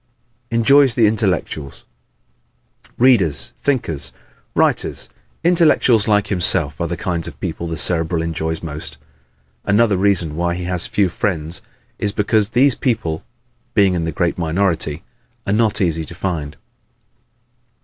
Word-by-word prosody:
Enjoys 130 +3 +4
the 115 - +4
Intellectuals 95 - -1 1.0
¶ - - -30
Readers, 115 - +3
thinkers, 80 - -1 0.4
writers - - 0 0.3
intellectuals 155 - +4
like 105 -1 +3
himself 85 -6 +2
are 85 - 0
the 85 +1 -4
kinds 85 -3 -3
of - - -10
people 85 - -4
the 80 -1 -4
Cerebral 80 0 0
enjoys 80 0 -3
most. 75 -1 -6 0.7
Another 105 0 +3
reason 90 -5 +2
why 85 +1 -1
he 90 - -5
has 90 -1 -1
few 100 -2 +1
friends 85 -2 -2 0.4
is 100 -1 -1
because 105 0 +1
these 130 +4 +4
people, 110 - -2 0.5
being 100 -3 +4
in 85 -2 -1
the 80 - -2
great 85 +3 -1
minority, 85 -1 0 0.4
are 100 - 0
not 110 -1 +2
easy 85 -4 0
to 85 - -11
find. 80 -5 -4
90 Hz, 135 wpm, -19 LUFS, 80-105 Hz, 1.0 s, Enjoys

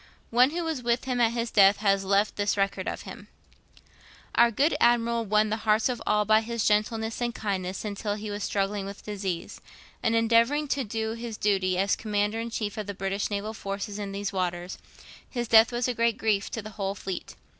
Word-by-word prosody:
One 250 +3 +5
who 340 +3 -3
was 320 -5 -2
with 240 0 0
him 250 -2 -1
at 230 -1 +3
his 235 -1 -2
death 200 -1 +6
has 195 -2 +2
left 200 +2 +2
this 205 0 0
record 195 -1 -1
of - - -4
him: - - -10 1.1
'Our 235 0 +5
good 280 +8 +2
Admiral 235 -1 +3
won 210 +1 +2
the 220 - 0
hearts 220 +2 +2
of 245 - -3
all 210 0 +3
by 215 +1 +5
his 230 0 -2
gentleness 220 +2 0
and 240 0 -1
kindness 190 -3 -3
while 205 0 -3
he 210 0 -6
was 205 0 -4
struggling 200 0 -1
with 200 0 -9
disease, 195 -5 -4 0.4
and 230 -1 +1
endeavouring 230 +6 +3
to 275 -1 0
do 220 0 -3
his 230 -1 -6
duty 190 -3 +1
as 195 +2 +2
Commander 210 0 -1
in 230 +1 -3
chief 215 -1 -3
of 210 - -5
the 205 - -5
British 195 +1 -2
naval 210 +1 -3
forces 200 0 -5
in 200 -1 -4
these 200 0 -4
waters. 180 -1 -3 0.5
His 240 -2 -3
death 225 +2 +6
was 240 +1 -1
a 250 - 0
great 230 -1 +1
grief 215 -4 0
to 225 - -5
the 215 - -8
whole 195 -1 -3
fleet. 190 -2 -6
215 Hz, 210 wpm, -27 LUFS, 200-230 Hz, 1.1 s, death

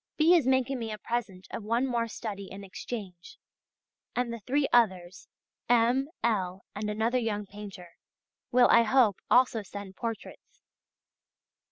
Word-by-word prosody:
B. 320 +3 +5
is 325 -8 +4
making 260 0 +2
me 225 -2 -4
a 215 - -4
present 210 -5 -4
of 225 - -5
one 230 +4 +1
more 235 -3 0
study 200 -4 -6
in 200 +1 -8
exchange, 190 -2 -8 0.8
and 245 -1 -1
the 235 - -6
three 275 +6 0
others, 190 -6 +2 0.4
M., 245 +4 +3
L., 190 -5 -1
and 210 +1 -3
another 225 +4 +1
young 210 -3 -2
painter, 195 -4 -11 0.5
will, 245 0 +6
I 235 - +7
hope, 230 -3 +3
also 245 -3 +4
send 200 -1 -9
portraits. 230 +1 -7
225 Hz, 145 wpm, -29 LUFS, 200-245 Hz, 0.8 s, I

